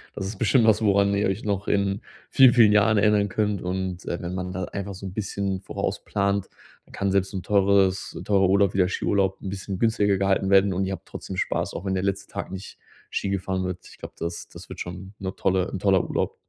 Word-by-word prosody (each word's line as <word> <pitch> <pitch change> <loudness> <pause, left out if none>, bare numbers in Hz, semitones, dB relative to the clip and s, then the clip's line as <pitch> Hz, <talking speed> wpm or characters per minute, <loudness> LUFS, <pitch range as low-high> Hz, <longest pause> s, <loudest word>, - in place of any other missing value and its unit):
Das 95 - -4
ist 100 0 -6
bestimmt 120 +1 +3
was, 110 -1 +4
woran 100 -1 +3
ihr 100 - +1
euch 95 +3 -3
noch 100 -1 -2
in 100 0 +1 0.3
vielen, 130 -3 +7
vielen 110 -4 +6
Jahren 105 +1 +4
erinnern 105 -1 +3
könnt. 105 -1 -1
Und, 90 0 -3
äh, 85 - -3
wenn 90 +1 -4
man 90 0 -4
da 90 0 -3
einfach 100 +1 -5
so 100 - -9
'n 95 - -6
bisschen 100 -2 -3
vorausplant, 100 0 -2 0.4
dann - - -21
kann 100 -1 -1
selbst 95 +1 +1
'n 95 - -3
teures 100 -1 +2
teurer 95 -2 +3
Urlaub, 100 +1 +3
wie 95 - -1
der 90 -1 +3
Skiurlaub 95 0 0
'n - - -6
bisschen 95 -1 -5
günstiger 105 -3 +2
gehalten 95 0 +1
werden 95 0 +5
und 95 +2 0
ihr 95 - -3
habt - - -9
trotzdem 95 - -7
Spaß, - - -1
auch - - -6
wenn 95 - -1
der 95 0 -1
letzte 100 0 -2
Tag 100 - -5
nicht 95 +1 -8 0.3
Ski 100 - -2
gefahren 95 -1 -2
wird. 90 -1 -5
Ich - - -16
glaube, - - -9
das 85 +1 -5
das - - -12
wird - - -8
schon 95 +2 -7
'ne 95 -1 -4
tolle 95 -1 +1
'n 95 - -4
toller 95 -1 +3
Urlaub. - - -2
95 Hz, 235 wpm, -25 LUFS, 95-100 Hz, 0.4 s, vielen